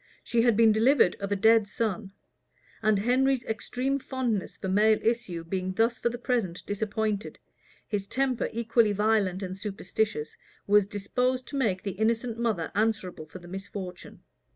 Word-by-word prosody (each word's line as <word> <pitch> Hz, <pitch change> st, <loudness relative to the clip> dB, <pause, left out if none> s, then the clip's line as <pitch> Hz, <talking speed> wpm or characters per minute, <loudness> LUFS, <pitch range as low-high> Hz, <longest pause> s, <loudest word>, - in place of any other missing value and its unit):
She 235 Hz, -1 st, +1 dB
had 235 Hz, -2 st, +3 dB
been 225 Hz, -1 st, +6 dB
delivered 225 Hz, -2 st, +4 dB
of 200 Hz, 0 st, -4 dB
a -, -, +3 dB
dead 220 Hz, +1 st, +4 dB
son; 210 Hz, -2 st, -2 dB, 0.7 s
and 215 Hz, -1 st, +3 dB
Henry's 255 Hz, +4 st, +2 dB
extreme 250 Hz, +5 st, -2 dB
fondness 250 Hz, -7 st, -2 dB
for -, -, -5 dB
male 210 Hz, +3 st, +4 dB
issue 225 Hz, -8 st, -1 dB
being 185 Hz, +2 st, -3 dB
thus 225 Hz, +4 st, +1 dB
for 235 Hz, -, +1 dB
the 240 Hz, -, -5 dB
present 235 Hz, -8 st, -2 dB
disappointed, 210 Hz, 0 st, -2 dB, 0.5 s
his 200 Hz, -2 st, -3 dB
temper, 260 Hz, -1 st, 0 dB
equally 230 Hz, -1 st, +2 dB
violent 205 Hz, -2 st, +1 dB
and 185 Hz, 0 st, -4 dB
superstitious, 195 Hz, -4 st, -3 dB, 0.3 s
was 205 Hz, -1 st, +4 dB
disposed 250 Hz, +5 st, -1 dB
to -, -, -6 dB
make 210 Hz, -9 st, 0 dB
the 200 Hz, -, -2 dB
innocent 230 Hz, +3 st, -1 dB
mother 220 Hz, -9 st, -1 dB
answerable 205 Hz, -7 st, -1 dB
for 165 Hz, -, -10 dB
the 175 Hz, -1 st, -13 dB
misfortune. 190 Hz, -1 st, -8 dB
215 Hz, 155 wpm, -27 LUFS, 195-235 Hz, 0.7 s, been